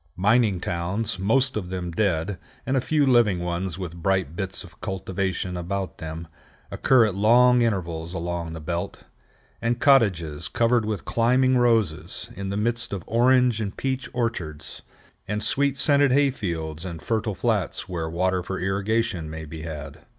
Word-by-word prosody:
Mining 105 0 +3
towns, 90 +4 -2
most 130 +7 +2
of 95 -4 -3
them 90 -2 -4
dead, 95 0 0 0.3
and 135 - 0
a 130 - +2
few 150 +2 +2
living 120 -7 +4
ones 90 0 -3
with 90 -3 -6
bright 95 -4 0
bits 95 0 -4
of - - -16
cultivation 95 -1 -3
about 95 +2 -4
them, 80 +1 -6 0.4
occur 125 -4 +4
at 105 - -1
long 120 +5 +5
intervals 85 -6 -1
along 85 -1 -3
the 80 - -6
belt, 85 +2 -4 0.6
and 120 +1 0
cottages 90 - +3
covered 115 -1 +2
with 105 -2 -3
climbing 130 +3 +3
roses, 115 -10 +1
in 100 0 -4
the 100 - -2
midst 115 +1 -1
of 95 - -4
orange 125 -1 +3
and 100 -2 -4
peach 135 -1 -2
orchards, 90 - -4 0.5
and 105 +1 -2
sweet 140 0 +1
scented 140 -2 +4
hay 140 +1 +4
fields 80 - -4
in 85 -3 -5
fertile 110 +6 -2
flats - - -1
where 85 -3 -3
water 90 +2 0
for 95 +1 -4
irrigation 95 -2 -1
may 80 0 -6
be 80 +1 -8
had. 75 -2 -7
95 Hz, 160 wpm, -24 LUFS, 85-120 Hz, 0.6 s, long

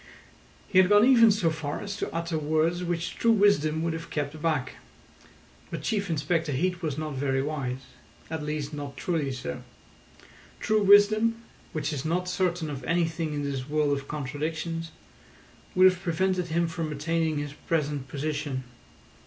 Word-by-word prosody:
He 185 - +4
had 185 0 +5
gone 205 +2 +7
even 235 -3 +7
so 200 -6 +2
far 155 -2 -4
as 200 -1 -5
to - - -3
utter 165 0 -2
words 160 +4 +1
which 170 -1 -3
true 230 - +3
wisdom 165 -7 +3
would 165 -1 0
have 165 +1 -6
kept 150 +1 -3
back. 150 -6 -1 0.9
But - - -5
Chief 200 -3 -1
Inspector 160 0 0
Heat 180 +6 0
was 155 -4 -2
not 155 -1 -3
very 135 0 0
wise—at 140 +2 -6
least 150 0 -3
not 145 -1 -6
truly 155 -5 -1
so. 75 - -5 1.0
True 215 0 +2
wisdom, 215 +3 +5 0.3
which 155 0 -2
is 140 -3 -3
not 180 +3 -1
certain 180 -3 -1
of 135 -2 -6
anything 165 -2 0
in 145 - -2
this 140 -1 -3
world 150 -1 +2
of 140 0 -6
contradictions, 160 +4 -3 0.9
would 185 0 +6
have 185 -1 +5
prevented 185 0 0
him 170 +1 +1
from 165 -1 -3
attaining 160 +1 0
his 145 -1 -4
present 145 -3 -2
position. 145 -2 -3
160 Hz, 160 wpm, -27 LUFS, 145-180 Hz, 1.0 s, gone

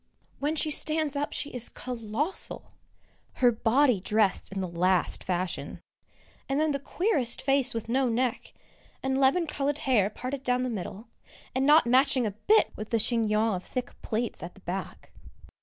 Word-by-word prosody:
When 295 +3 -1
she 310 0 0
stands 310 -1 +2
up 290 +1 -2
she 290 - -2
is 245 -2 +1
colossal! 250 - -4 0.6
Her 245 -2 +4
body 240 +1 +2
dressed 205 0 +1
in 195 - -4
the 185 - -2
last 180 +1 +1
fashion, 180 0 -3 0.7
and 270 +2 +1
then 310 0 +2
the 280 - -2
queerest 280 - 0
face 270 -1 +2
with 225 -1 -4
no 255 +2 +1
neck, 240 +1 -1 0.5
and 265 0 0
lemon 275 +6 +3
coloured 290 -2 -2
hair 220 -7 +3
parted 255 +5 -5
down 250 -1 0
the 255 - -2
middle, 210 +2 -6 0.4
and 265 +2 +1
not 300 0 +6
matching 260 +1 +4
a 210 - -1
bit 320 - +2
with 215 - -7
the 230 - +2
chignon 220 -1 +1
of 185 -1 -4
thick 250 -1 -5
plaits 230 +1 -3
at 175 - -8
the 195 - -17
back. 185 0 -6
250 Hz, 170 wpm, -27 LUFS, 215-275 Hz, 0.7 s, not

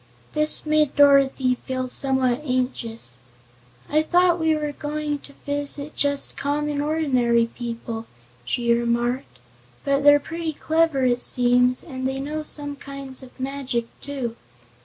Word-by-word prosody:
This 305 +1 +4
made 305 -2 +2
Dorothy 275 -2 +5
feel 255 -1 -3
somewhat 260 -1 +2
anxious. 250 - -3 0.7
"I'd 310 +1 +1
thought 355 -1 +4
we 320 -1 +2
were 300 -1 -2
going 295 0 -3
to 280 - -15
visit 285 +1 -1
just 285 -1 0
common, 290 0 -1
ordinary 260 -7 +2
people," 230 -1 -6 0.4
she 235 - +1
remarked, 235 - -1 0.5
"but 280 0 +1
they're 290 0 +7
pretty 325 +2 -4
clever, 315 -3 +1
it 245 0 +3
seems, 250 0 +3
and 260 -4 -4
they 265 0 -3
know 300 +3 -3
some 290 -1 -5
kinds 275 -1 -8
of 260 0 -15
magic, 260 -3 -2 0.2
too. 265 -5 -4
275 Hz, 135 wpm, -23 LUFS, 250-295 Hz, 0.7 s, they're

